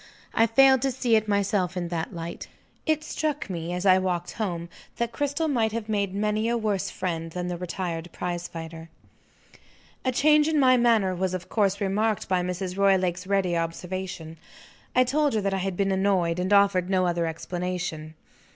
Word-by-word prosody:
I 225 - +4
failed 265 +3 +5
to 270 - +1
see 245 -2 +2
it 215 -1 +2
myself 200 -3 0
in 175 -1 -2
that 165 -1 -3
light. 170 0 -6 0.4
It 310 -1 +1
struck 300 -7 -3
me, 170 -1 -4
as 180 +2 -3
I 185 -1 +6
walked 180 -2 -2
home, 175 -6 -3 0.3
that 235 0 -1
Cristel 285 +5 -1
might 230 -7 +1
have 225 -2 -3
made 200 -3 -1
many 215 +2 0
a 235 - +1
worse 210 -4 -1
friend 165 -3 -3
than 180 +1 -3
the 175 - -2
retired 175 -1 -4
prize 175 -1 -4
fighter. 165 -1 -8 1.1
A 255 - +1
change 300 +3 +4
in 315 -2 +2
my 255 -2 +6
manner 230 -6 +3
was 185 0 -1
of 180 -1 -7
course 200 -2 +1
remarked 210 +2 0
by 185 -1 +1
Mrs. 180 +1 -3
Roylake's 185 -2 +2
ready 195 -3 +1
observation. 165 0 -4 0.6
I 255 - +6
told 285 +1 +1
her 215 - +1
that 195 0 -1
I - - 0
had 190 -1 -3
been 195 -1 +1
annoyed, 190 -3 +1
and 185 +2 -1
offered 200 -3 +4
no 185 -1 +2
other 170 -1 0
explanation. 170 -1 -4
190 Hz, 185 wpm, -26 LUFS, 175-220 Hz, 1.1 s, I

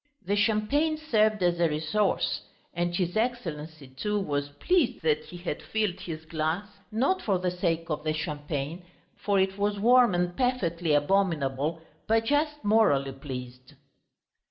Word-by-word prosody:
The 200 +3 +1
champagne 225 +10 +2
served 215 -9 +2
as 175 -1 +2
a 170 -1 +3
resource, 160 +7 0 0.3
and 175 0 -1
his 175 0 -1
Excellency, 165 - -3
too, 210 +11 -2
was 145 -6 -2
pleased 255 - +1
that 155 -1 +1
he 175 - -10
had 175 -4 -4
filled 210 -4 -1
his 160 -4 -7
glass 160 +4 -1 0.3
not 275 - +1
for 195 -3 +1
the 180 0 -1
sake 170 -2 -1
of 150 - -2
the 155 0 0
champagne, 150 +1 -4 0.3
for 200 -1 +1
it 190 +1 0
was 205 0 0
warm 240 -2 +5
and 175 0 0
perfectly 175 - 0
abominable, 155 -2 +1 0.2
but 225 +1 +2
just 295 +3 0
morally 205 -11 +3
pleased. 130 0 -8
175 Hz, 150 wpm, -28 LUFS, 155-215 Hz, 0.3 s, warm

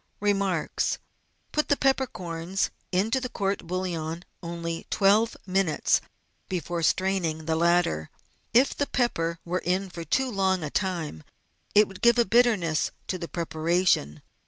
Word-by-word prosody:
Remariis. 200 -5 0 0.3
— - - -43
Put 300 - +1
the 285 - +4
peppercorns 190 -10 0 0.2
into 220 +8 +1
the 250 - -3
court 195 -5 -2
bo^iillon 170 -2 -3 0.2
only 170 -1 -5
twelve 210 +3 +3
minutes 185 -5 +2 0.5
before 175 -1 -2
straining 170 -2 +1
the 160 0 +1
latter. 170 - +2 0.4
If 250 +4 +4
the 285 - -1
pepper 170 -10 0
were 180 +1 -1
in 185 +2 0
for 170 -1 -6
too 255 - 0
long 190 -4 +1
a 150 - -4
time 170 - -2 0.5
it 210 +1 +7
would 195 - -12
give 235 0 +5
a 235 - +4
bitterness 205 -8 +3 0.2
to 185 - -2
the 170 - -5
preparation. 165 - 0
185 Hz, 140 wpm, -27 LUFS, 165-205 Hz, 0.5 s, it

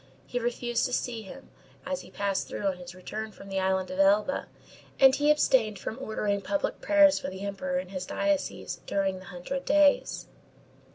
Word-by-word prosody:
He 245 - -3
refused 240 0 -1
to 250 - -6
see 235 -2 -1
him, 195 - -12 0.3
as 275 0 -2
he - - -13
passed 200 -1 -1
through 205 - -5
on 190 -2 +1
his 175 0 -10
return 215 +4 -6
from 195 -1 -13
the 195 0 -1
island 190 -1 0
of 185 - -5
Elba, 205 +7 +3 0.5
and 265 -1 +8
he 290 +2 +2
abstained 250 -8 +3
from 225 - -6
ordering 210 -4 -1
public 295 +7 -2
prayers 300 -1 +5
for - - -4
the 190 0 -8
Emperor 270 +8 -2
in 275 - -4
his 185 -1 -5
diocese 300 -1 -1
during 195 -1 0
the 185 - -13
Hundred 180 +10 -5
Days. 295 0 +3
215 Hz, 185 wpm, -28 LUFS, 195-275 Hz, 0.5 s, and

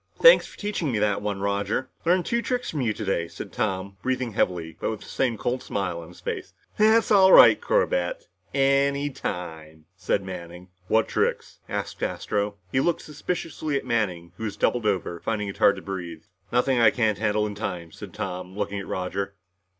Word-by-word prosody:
"Thanks - - +8
for - - -15
teaching 205 -8 -2
me 110 - 0
that 105 -1 +1
one, 105 -1 -3
Roger. 100 +5 -1 0.2
Learned 180 +1 +3
two 235 0 0
tricks 250 0 -2
from 150 - -2
you 115 -3 +1
today," 95 -5 -1
said - - -9
Tom, 95 +1 -2
breathing 130 -2 -1
heavily, 90 -6 -1
but - - -1
with 110 -2 -4
the - - -11
same 120 -4 -1
cold 125 +4 -1
smile 90 -4 -3
on 80 - -11
his 85 - -15
face. - - -5 0.2
"That's 220 +2 +4
all 190 -2 +7
right, - - +9
Corbett. - - 0 0.2
Any 140 +1 +2
time," 80 -7 -6
said 100 - 0
Manning. 90 -1 -8 0.2
"What 110 0 +3
tricks?" - - -1
asked - - -4
Astro. 100 0 -1 0.2
He 130 - +2
looked 170 +5 +1
suspiciously 155 -1 -3
at 135 - -5
Manning, 95 -9 -1
who - - -7
was 105 -1 -4
doubled 120 -1 +1
over, 90 -4 -1
finding 105 0 -2
it 100 - -7
hard 100 - +5
to - - -9
breath. 85 -4 -6 0.2
"Nothing 125 +1 +2
I 115 - +7
can't 110 -4 0
handle 105 -1 +1
in 105 - -4
time," 90 -5 -5
said - - -10
Tom, 90 +1 -5
looking 100 -1 -2
at 95 - -7
Roger. 95 +2 -3
105 Hz, 190 wpm, -25 LUFS, 95-135 Hz, 0.2 s, right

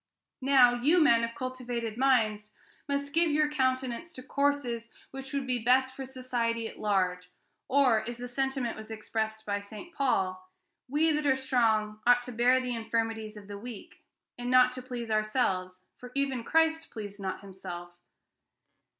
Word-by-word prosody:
Now, 260 -2 +6
you 285 +9 +3
men 235 -7 +5
of 230 0 -3
cultivated 245 -3 -4
minds 220 -5 +2 0.3
must 280 0 -2
give 335 0 +4
your 300 0 +2
countenance 260 +2 -1
to 255 - -9
courses 265 -4 -1 0.2
which 270 0 -8
would 280 -1 -2
be 250 -1 0
best 260 +2 +3
for 270 - -5
society 245 -3 -2
at - - -11
large, 185 -3 0 0.4
or, 260 -5 +4
as 240 - -6
the 245 0 -6
sentiment 265 -1 -1
was 220 0 -10
expressed 220 0 -3
by 205 -1 -1
St. 215 +12 -11
Paul, 185 - 0 0.4
'We 310 +4 +3
that 300 -1 0
are 265 - +4
strong 220 -5 +1
ought 245 0 +6
to 250 - -7
bear 245 +2 +4
the 250 -1 -3
infirmities 225 -1 -2
of 200 -1 -11
the 205 -1 -7
weak, 235 -1 -10 0.4
and 245 0 -3
not 255 0 +6
to 255 0 -7
please 245 -3 -6
ourselves, 195 -4 0 0.2
for 250 0 -10
even 270 -3 0
Christ 320 +3 +2
pleased 205 -2 -8
not 190 -1 -4
himself.' 185 -3 -8
245 Hz, 165 wpm, -29 LUFS, 215-265 Hz, 0.4 s, Now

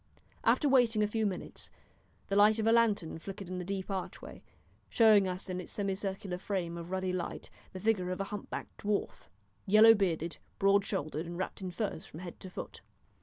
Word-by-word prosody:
After 295 - +3
waiting 240 -5 +4
a - - +2
few 220 0 0
minutes 190 - -6 0.6
the 195 - -1
light 210 +2 +6
of 220 - -1
a 225 - +5
lantern 215 -8 +2
flickered 195 +1 -8
in 185 0 -4
the - - -4
deep 195 +1 -4
archway, 190 -2 -6 0.5
showing 215 -4 +5
us 185 0 -4
in 185 -1 -3
its - - -9
semicircular 195 -1 -3
frame 180 -4 -3
of 170 0 -7
ruddy 185 0 -1
light 180 -2 -4 0.2
the 185 - -7
figure 190 -3 +1
of 185 - -3
a - - 0
humpbacked 205 0 -6
dwarf, 205 0 -2 0.4
yellow 215 +3 +8
bearded, 170 -5 -1 0.2
broad 200 0 +4
shouldered, 160 -5 -3
and 170 0 -6
wrapped 190 +2 -4
in 185 - -3
furs 195 -2 -4
from 160 - -10
head 175 -2 -8
to 190 - -8
foot. - - -8
195 Hz, 190 wpm, -32 LUFS, 180-210 Hz, 0.6 s, yellow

